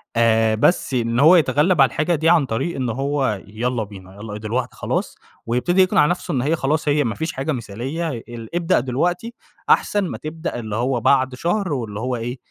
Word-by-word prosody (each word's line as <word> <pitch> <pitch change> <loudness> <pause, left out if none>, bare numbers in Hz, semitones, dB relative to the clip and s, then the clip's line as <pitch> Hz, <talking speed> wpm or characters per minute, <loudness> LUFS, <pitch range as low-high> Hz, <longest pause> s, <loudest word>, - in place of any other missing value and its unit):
آآ، 110 -1 +3
بس 135 +3 +2
إن 115 -1 0
هو 160 +6 +7
يتغلّب 150 +1 +3
على 135 - +7
الحاجة 155 +7 0
دي 160 +2 +2
عن 170 -5 +4
طريق 130 +9 -2
إن 130 -2 -2
هو 135 -4 -1
يالّا 115 +3 -2
بينا، 95 -2 -12
يالّا 105 0 -7
دلوقت 120 +4 -3
خلاص، - - -3 0.3
ويبتدي 150 +11 +2
يقنع 185 -5 +4
نفسه 175 +1 -2
إن 130 - 0
هي 150 +6 +1
خلاص، 150 +1 -1
هي 145 0 +3
ما 115 -4 -2
فيش 160 0 -3
حاجة 135 +3 -2
مثالية 130 +7 -4
ال 120 +1 -8
ابدأ 170 -6 +2
دلوقتي 175 - -1 0.4
أحسن 205 -1 +3
ما - - -5
تبدأ 155 -3 -5
اللي 110 -3 -5
هو 120 +1 0
بعد 130 0 +2
شهر 175 +3 -1
واللي 110 -5 -4
هو 125 +1 -2
إيه، 120 +2 -4
130 Hz, 195 wpm, -21 LUFS, 115-160 Hz, 0.4 s, هو